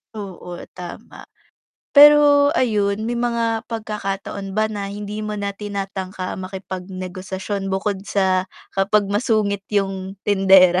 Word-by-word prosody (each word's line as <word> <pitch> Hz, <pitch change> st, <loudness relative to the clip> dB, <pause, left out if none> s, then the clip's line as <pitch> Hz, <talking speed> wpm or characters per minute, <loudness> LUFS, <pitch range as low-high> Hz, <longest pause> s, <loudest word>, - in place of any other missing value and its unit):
Oo 185 Hz, -4 st, -7 dB, 0.2 s
tama. 175 Hz, -1 st, -9 dB, 0.7 s
Pero 290 Hz, 0 st, +8 dB
ayun 210 Hz, -5 st, +1 dB
may 235 Hz, +1 st, -2 dB
mga 230 Hz, -2 st, 0 dB
pagkakataon 200 Hz, -3 st, -4 dB
ba 215 Hz, 0 st, +2 dB
na 200 Hz, -1 st, -4 dB
hindi 205 Hz, +1 st, -5 dB
mo 210 Hz, -, -3 dB
na 200 Hz, -1 st, -2 dB
tinatangka 195 Hz, -2 st, -5 dB
makipagnegosasyon 190 Hz, +1 st, -5 dB
bukod 195 Hz, 0 st, -2 dB
sa 190 Hz, -2 st, +2 dB, 0.3 s
kapag 200 Hz, +2 st, +2 dB
masungit 210 Hz, -2 st, +1 dB
yung 195 Hz, -1 st, -1 dB
tindera? 190 Hz, -3 st, +6 dB
200 Hz, 110 wpm, -21 LUFS, 190-215 Hz, 0.7 s, Pero